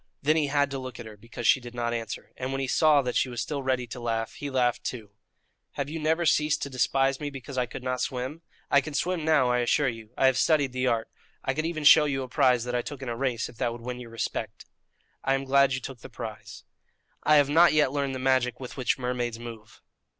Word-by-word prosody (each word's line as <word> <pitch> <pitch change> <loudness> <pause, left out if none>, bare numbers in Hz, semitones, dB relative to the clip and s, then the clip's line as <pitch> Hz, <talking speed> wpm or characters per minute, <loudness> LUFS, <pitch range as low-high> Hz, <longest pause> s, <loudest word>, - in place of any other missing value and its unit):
Then 155 +3 +3
he 155 -2 +2
had 145 0 +1
to 135 - -3
look 130 -2 -8
at 120 - -7
her 110 -1 -10
because 115 +3 -9
she - - +6
did 120 -1 -10
not 120 -1 -1
answer, 115 -2 -5
and 130 +1 -4
when 135 - -2
he 135 - -1
saw 150 0 +4
that 125 -1 -3
she 130 - +2
was 120 -1 -5
still 140 +6 -2
ready 130 -2 0
to 120 +1 -8
laugh, 115 -1 -2
he 145 - -6
laughed, 125 -3 +1
too. 110 -5 -5 0.6
"Have 140 +1 -4
you 165 - -4
never 160 +2 +1
ceased 150 -1 +2
to 140 - -5
despise 135 +1 +1
me 145 - -3
because 135 -1 -8
I 125 -1 0
could 125 - -8
not 125 0 -2
swim? 130 +5 -3 0.3
I 140 - +6
can 150 +1 -7
swim 175 +2 0
now, 150 -6 +3
I 125 - +2
assure 130 +4 +2
you. 115 -2 -8
I - - +3
have 130 -1 +4
studied 145 -5 +3
the 130 0 -1
art. 115 -2 0 0.4
I 135 - +1
could 155 +3 -1
even 160 -2 -4
show 150 +1 +8
you 135 -2 -1
a - - -6
prize 125 -1 +3
that 125 0 -4
I 125 - +1
took 135 +1 -8
in 130 - -4
a 120 - -2
race, 120 -2 -1
if 115 - -14
that 120 - 0
would 120 - -9
win 125 +1 -5
your 120 -2 -9
respect." 115 -1 -4 0.6
"I 135 - +2
am 135 - -2
glad 135 0 +4
you - - -3
took 130 -1 -8
the - - -11
prize." - - -8 0.6
"I 150 - +4
have 145 -1 +5
not 165 +4 +6
yet 150 -4 +3
learned 140 -2 -1
the - - -3
magic 130 -2 +1
with 125 0 -8
which 125 -2 +1
mermaids 125 -2 -2
move." 115 -2 -11
130 Hz, 260 wpm, -27 LUFS, 120-140 Hz, 0.6 s, show